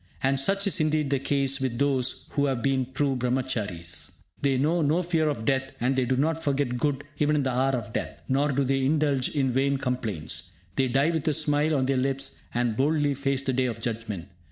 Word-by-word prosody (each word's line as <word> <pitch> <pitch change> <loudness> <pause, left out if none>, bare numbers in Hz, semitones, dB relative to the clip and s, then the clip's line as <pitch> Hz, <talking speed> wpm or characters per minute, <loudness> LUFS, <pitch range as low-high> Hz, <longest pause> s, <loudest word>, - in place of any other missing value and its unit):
And 135 0 +2
such 195 +8 +2
is 190 -2 +2
indeed 155 -2 +1
the 140 - +2
case 135 0 +1
with 130 -3 -1
those 130 -2 0
who 140 - +1
have 130 -4 -1
been 130 -2 0
true 135 0 0
Brahmacharies. 120 -9 -2 0.3
They 135 -2 +2
know 160 +6 +2
no 155 +4 +2
fear 165 -3 +1
of 115 -7 -3
death, 135 0 0
and 125 +3 +1
they 130 -1 +2
do 130 +1 0
not 160 +4 0
forget 140 -3 0
good 140 +1 -1 0.2
even 150 0 +3
in 145 - +1
the 130 - 0
hour 130 +2 +1
of 115 -3 -3
death; - - -4
nor 140 +2 +2
do 140 +1 +1
they 135 0 +1
indulge 145 -2 +2
in 135 -3 0
vain 135 +2 +1
complaints. 115 - -3 0.2
They 135 - +2
die 135 +6 +2
with 160 -2 -2
a 155 - +3
smile 150 0 +2
on 130 -2 +1
their 135 0 +1
lips, 135 +1 0
and 120 -2 0
boldly 145 +2 +2
face 135 0 -1
the 135 - 0
day 130 +1 +1
of 115 -3 -3
judgment. 110 -6 -4
135 Hz, 220 wpm, -26 LUFS, 125-145 Hz, 0.3 s, even